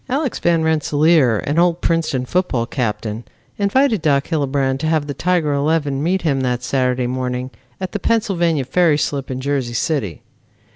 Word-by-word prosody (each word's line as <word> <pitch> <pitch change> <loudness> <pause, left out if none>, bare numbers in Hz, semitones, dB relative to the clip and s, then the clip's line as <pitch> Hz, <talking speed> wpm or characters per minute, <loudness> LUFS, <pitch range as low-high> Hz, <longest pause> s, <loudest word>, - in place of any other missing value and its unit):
Alex 270 0 -1
Van 170 -2 +2
Rensselaer, 155 -5 +3
an 150 +4 0
old 175 -1 +2
Princeton 160 -8 0
football 130 -7 0
captain, 115 -2 -3 0.4
invited 220 - +2
Doc 140 -3 +1
Hillebrand 140 -4 0
to 155 - -2
have 155 -2 +1
the 145 - -4
Tiger 165 0 0
eleven 145 -1 0
meet 180 +4 0
him 140 -5 +1
that 125 -1 -1
Saturday 125 -1 0
morning 125 0 -3 0.3
at 185 -1 -4
the 205 - -3
Pennsylvania 175 - +1
Ferry 160 +3 +3
slip 140 -2 -2
in 130 -1 -4
Jersey 130 -3 -2
City. 115 - -2
145 Hz, 160 wpm, -19 LUFS, 130-170 Hz, 0.4 s, Rensselaer